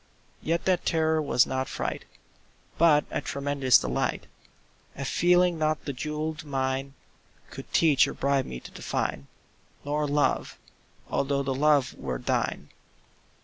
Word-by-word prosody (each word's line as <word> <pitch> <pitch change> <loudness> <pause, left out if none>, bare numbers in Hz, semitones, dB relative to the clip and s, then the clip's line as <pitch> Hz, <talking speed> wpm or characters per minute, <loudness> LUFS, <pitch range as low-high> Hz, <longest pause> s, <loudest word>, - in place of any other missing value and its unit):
Yet 165 +2 -1
that 185 -2 +2
terror 160 -1 +1
was 140 -4 +3
not 130 0 -2
fright, - - -4 0.7
But 155 -3 +5
a - - -2
tremulous 140 -2 +2
delight— - - -2 0.7
A 140 - -5
feeling 175 +3 +3
not 155 0 0
the 140 - -3
jewelled 150 +2 -4
mine 135 -1 -2 0.6
Could - - -10
teach 155 -5 +4
or - - -6
bribe 140 -1 +1
me 60 - -6
to - - -12
define— 70 - -3 0.6
Nor 150 +1 -1
Love—although 140 - -2
the 135 -1 -1
Love 145 -1 +3
were 65 -2 -3
thine. - - -2
145 Hz, 130 wpm, -27 LUFS, 135-155 Hz, 0.7 s, But